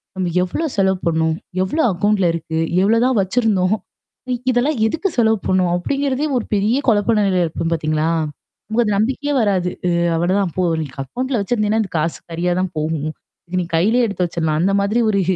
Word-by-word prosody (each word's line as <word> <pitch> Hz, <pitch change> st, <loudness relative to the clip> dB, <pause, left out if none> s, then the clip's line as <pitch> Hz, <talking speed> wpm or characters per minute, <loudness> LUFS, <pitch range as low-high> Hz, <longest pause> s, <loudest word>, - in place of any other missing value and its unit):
நம்ம 185 Hz, -2 st, -1 dB
எவ்ளோ 185 Hz, -, -2 dB
செலவு 190 Hz, -1 st, +2 dB
பண்ணோம்? 160 Hz, -1 st, +1 dB, 0.3 s
எவ்ளோ 245 Hz, +13 st, -1 dB
அக்கவுண்ட்ல 195 Hz, 0 st, +1 dB
இருக்கு? 160 Hz, -1 st, -3 dB, 0.2 s
எவ்ளோதான் 230 Hz, +4 st, +3 dB
வச்சிருந்தோம்? 195 Hz, -1 st, +1 dB, 0.8 s
இதெல்லாம் 255 Hz, +4 st, +1 dB
எதுக்கு 320 Hz, -, -1 dB
செலவு 220 Hz, -1 st, +3 dB
பண்ணும்? 185 Hz, -1 st, +2 dB
அப்டிங்கிறதே 275 Hz, +8 st, -1 dB
ஒரு 240 Hz, -, -2 dB
பெரிய 210 Hz, +4 st, +2 dB
குழப்ப 220 Hz, 0 st, +3 dB
நெலையில 195 Hz, -3 st, +2 dB
இருக்கும் 165 Hz, +1 st, -3 dB
பார்த்தீங்களா? 155 Hz, 0 st, 0 dB, 0.6 s
உங்க 235 Hz, +2 st, +3 dB
நம்பிக்கையே 265 Hz, +7 st, 0 dB
வராது. 190 Hz, -4 st, +1 dB, 0.2 s
அ -, -, +2 dB, 0.3 s
அவ்ளோதான் 180 Hz, +1 st, +1 dB
போ 185 Hz, -, +2 dB, 0.2 s
நீக்கு 140 Hz, -2 st, -8 dB
அக்கவுண்ட்ல 250 Hz, -, -2 dB
வச்சிருந்தீங்கன்னா, 215 Hz, 0 st, +1 dB
அது 195 Hz, -, -8 dB
காசு 160 Hz, +2 st, -1 dB
கரியா 175 Hz, +2 st, -1 dB
தான் 185 Hz, -, -1 dB
போகும். 155 Hz, -1 st, -1 dB, 0.4 s
இதுக்கு 180 Hz, +1 st, -1 dB
நீ -, -, -3 dB
கையிலேயே 225 Hz, +9 st, +3 dB
எடுத்து 200 Hz, -3 st, -1 dB
வச்சரலாம். 160 Hz, -2 st, -1 dB
அந்த 195 Hz, +3 st, +2 dB
மாதிரி 210 Hz, +4 st, +1 dB
ஒரு 200 Hz, -2 st, +2 dB
195 Hz, 165 wpm, -19 LUFS, 170-225 Hz, 0.8 s, எவ்ளோதான்